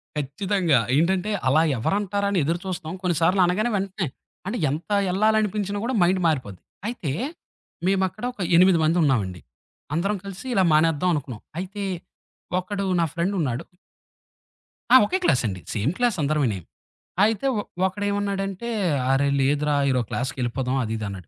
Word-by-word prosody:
ఖచ్చితంగా. 155 - +1 0.2
ఏంటంటే 185 +5 +1 0.2
అలా 155 +5 +4 0.2
ఎవరంటారని 200 - 0
ఎదురు 165 +4 0
చూస్తాం. 170 -4 -4
కొన్నిసార్లు 180 +2 +2
అనగానే 215 +7 +1
వెంటనే 190 -3 -2 0.4
అంటే, 225 +5 -2
ఎంత 155 +8 -4 0.2
ఎళ్ళాలనిపించినా 210 0 +1
కూడా 255 - -1
మైండ్ 185 +2 +3
మారిపోద్ది. 125 - -1 0.3
అయితే, 180 - -3 0.7
మేమక్కడ 190 +3 0
ఒక 205 - -9
ఎనిమిది 180 0 +6
మంది 160 +3 +2
ఉన్నామండి. 100 - 0 0.5
అందరం 195 +5 0
కలిసి 195 +5 -8
ఇలా 190 - +4
మానేద్దాం 160 +2 +3
అనుకున్నాం. 130 -7 -4 0.2
అయితే, 200 +2 -5 0.8
ఒకడు 200 +1 -3
నా 165 - +3
ఫ్రెండున్నాడు. 170 -8 -1 1.3
ఆ! - - +11
ఒకే 375 - 0
క్లాసండి. 105 - +1
Same 110 +6 0
class 240 -6 +1
అందరమేనీ. 140 -8 +1 0.7
అయితే 220 +4 +1
ఒ - - 0 0.2
ఒకడేమన్నాడంటే, 200 +1 -2 0.4
"అరే! 140 +1 +3
లేదురా 145 +2 +2
ఈరోజు 125 -3 +1
క్లాస్‌కెళ్ళిపోదాం" 130 0 -2
అది 110 0 -3
ఇదన్నాడు. 100 -6 -6
175 Hz, 125 wpm, -24 LUFS, 140-200 Hz, 1.3 s, ఆ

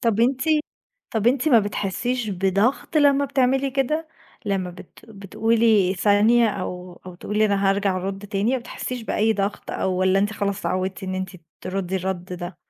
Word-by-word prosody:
طّب 230 -2 +1
أنتِ 255 +2 +2 0.7
طّب 220 +1 0
أنتِ 265 +4 +3
ما 240 -5 +7
بتحسيش 215 +4 -2
بضغط 195 - 0
لما 285 -1 +4
بتعملي 270 0 +1
كده؟ 305 +4 -1 0.4
لما 195 -3 -1
بت 180 0 -14
بتقولي 220 -1 +2
ثانية 215 +4 +4
أو 180 -2 -6
أو 180 - -8
تقولي 210 +4 0
أنا 200 -1 +2
هارجع 195 -1 +1
أرد 195 +2 -4
تاني، 205 +5 0
ما 260 - +1
بتحسيش 245 0 -6
بأي 220 0 +1
ضغط 200 0 -3
أو 190 - -1
والّا 185 +1 +2
أنتِ 205 +2 +1
خلاص 200 -2 -2
اتعودتِ 185 +2 -2
إن 185 0 -3
أنتِ 185 0 -3 0.3
تردي 190 0 -3
الرد 185 -1 -3
ده؟ 175 0 -6
205 Hz, 165 wpm, -23 LUFS, 190-235 Hz, 0.7 s, ما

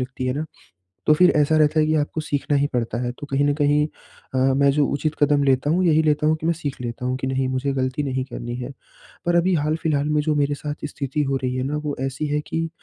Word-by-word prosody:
लगती 130 0 -4
हैं 125 - 0
ना, 150 - -2 0.6
तो 155 - +6
फिर 180 +3 +5
ऐसा 150 +1 +3
रहता 155 +1 +3
है 155 - +3
कि 155 - +1
आपको 155 +1 -1
सीखना 145 -1 -1
ही 140 - +2
पड़ता 115 -2 -1
है। 120 0 -2
तो 145 - -7
कहीं 135 +1 +2
न 145 - +2
कहीं 150 0 +2 0.5
अ, - - +1 0.2
मैं 140 0 +4
जो 145 0 +2
उचित 150 +2 -1
कदम 145 -1 +4
लेता 135 +1 +2
हूँ, 180 +3 +2
यही 160 -1 +4
लेता 150 0 +2
हूँ 155 +1 +3
कि 160 - -3
मैं 170 - +3
सीख 145 -5 -5
लेता 120 +1 -4
हूँ 130 0 0
कि 130 - -3
नहीं 130 0 0
मुझे 130 +2 -1
ग़लती 130 +2 -1
नहीं 130 -2 -2
करनी 120 -2 -6
है, 125 +2 -6 0.5
पर 175 0 +2
अभी 180 +2 +3
हाल-फिलहाल 150 -1 0
में 150 0 +2
जो 150 - +2
मेरे 145 0 +1
साथ 150 0 -6
स्थिति 140 +1 -2
हो 135 0 -1
रही 125 0 -1
है 130 - -1
ना, 145 +3 -2
वो 150 -1 -3
ऐसी 135 +3 -3
है 150 +1 0
कि 165 0 -2
145 Hz, 260 wpm, -22 LUFS, 130-155 Hz, 0.6 s, तो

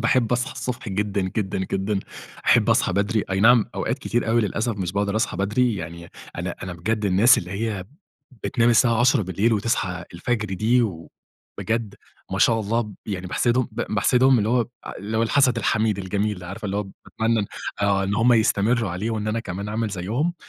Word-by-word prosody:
باحب 125 -2 +2
أصحى 125 +4 0
الصبح 125 -2 -5
جدًا، 100 0 -1
جدًا، 95 +1 -2
جدًا، 95 +2 -1 0.5
أحب - - +4
أصحى - - +2
بدري، 100 +3 0
أي 95 0 0
نعم 120 0 +6
أوقات - - -2
كتير 120 -1 -1
أوي 115 +1 +3
للأسف 110 +2 -1
مش 90 -3 -3
باقدر 100 +1 0
أصحى 110 -4 -1
بدري، 110 +5 +1
يعني 85 -1 -7 0.3
أنا - - -3
أنا 90 -1 -5
بجد 105 +5 -2
الناس 100 +6 +5
اللي 90 - -6
هي 100 -1 -3 0.6
بتنام 120 -3 +2
الساعة 115 -1 +4
22:00 130 0 +4
بالليل 95 +5 0
وتصحى 100 -5 -1
الفجر 105 +2 -2
دي 115 +6 +3
و 85 -8 -4 0.5
بجد 115 -2 -2 0.4
ما - - -1
شاء 115 -1 +4
الله 110 +1 -1
يعني 95 -3 -4
باحسدهم، 120 +7 +1
باحسدهم 125 +5 +3
اللي 105 0 0
هو 120 0 +2 0.3
اللي 105 +3 -4
هو 115 - +2
الحسد 125 +1 +3
الحميد 110 -1 +1
الجميل، 100 +2 -1
اللي 90 -2 -10
عارفة 100 +4 -6
اللي 100 0 -2
هو 105 - 0 0.2
باتمنى 110 -2 0 0.4
آه، 100 -1 +2
إن 100 +1 -1
هُم 120 +2 +4
يستمروا 110 -1 +2
عليه 95 +6 -3
وإن 110 -1 -2
أنا 115 +2 -1
كمان 100 0 -5
أعمل 110 +1 -1
زيهم، 110 - -2
105 Hz, 185 wpm, -23 LUFS, 95-115 Hz, 0.6 s, نعم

